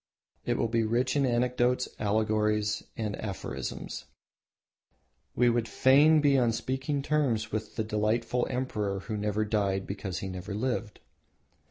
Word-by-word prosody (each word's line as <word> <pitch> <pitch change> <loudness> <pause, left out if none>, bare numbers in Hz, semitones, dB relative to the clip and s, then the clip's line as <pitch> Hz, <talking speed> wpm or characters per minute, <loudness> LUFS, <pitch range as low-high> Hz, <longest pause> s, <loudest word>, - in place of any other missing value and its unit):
It - - +1
will 115 - +1
be 115 +1 +1
rich 120 +5 +1
in 140 -2 +3
anecdotes, 125 +1 +1
allegories, 105 0 +1 0.2
and 105 -2 -2
aphorisms. 100 -3 -5 1.3
We 125 - +4
would 120 -1 +2
fain 145 +6 +5
be 140 -2 +4
on 120 -2 +2
speaking 135 +4 -2
terms 125 -8 0
with 110 0 -4
the 110 - -1
delightful 110 +3 0
emperor 105 -6 -2
who 110 +2 -5
never 105 +1 0
died 100 -3 0
because 95 -2 -4
he 95 - -4
had 95 - -5
never 95 +3 -6
lived. 115 -2 -2
110 Hz, 145 wpm, -29 LUFS, 105-125 Hz, 1.3 s, fain